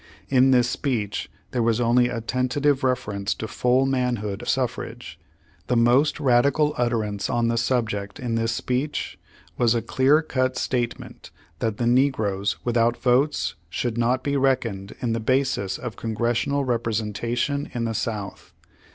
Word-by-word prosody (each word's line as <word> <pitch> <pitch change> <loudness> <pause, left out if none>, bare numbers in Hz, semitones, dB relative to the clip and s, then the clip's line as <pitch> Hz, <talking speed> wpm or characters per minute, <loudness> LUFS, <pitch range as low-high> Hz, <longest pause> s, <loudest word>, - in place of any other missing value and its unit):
In 130 0 +5
this 125 -2 +4
speech 120 -5 -2 0.2
there 125 - 0
was 115 0 +2
only 120 +1 +3
a 115 -2 -3
tentative 130 +4 0
reference 105 -6 -1
to 110 - -5
full 125 +4 +2
manhood 120 -6 -1
suf 125 -2 0
rage. 120 +1 -9 0.5
The 125 - +1
most 120 +7 +3
radical 140 +3 +3
utterance 110 -5 -1
on 120 -1 +1
the 115 - +1
subject 110 -3 -1
in 125 -3 -3
this 115 0 0
speech 125 +5 -2 0.4
was 120 -1 +3
a 115 - +1
clear 135 +6 +3
cut 130 -3 -1
statement 120 -2 -3 0.3
that 110 -2 -1
the 120 - -1
negroes 110 -6 +1
without 120 0 +2
votes 125 - +1 0.2
should 115 +7 -2
not 120 +2 +1
be 140 -1 -1
reckoned 125 -8 0
in 120 -2 0
the 115 - -1
basis 130 -5 0
of 120 -3 -7
Congressional 120 +5 0
representation 115 +4 -1
in 120 - -1
the 115 - -2
South. 105 -2 -4
120 Hz, 150 wpm, -24 LUFS, 115-130 Hz, 0.5 s, In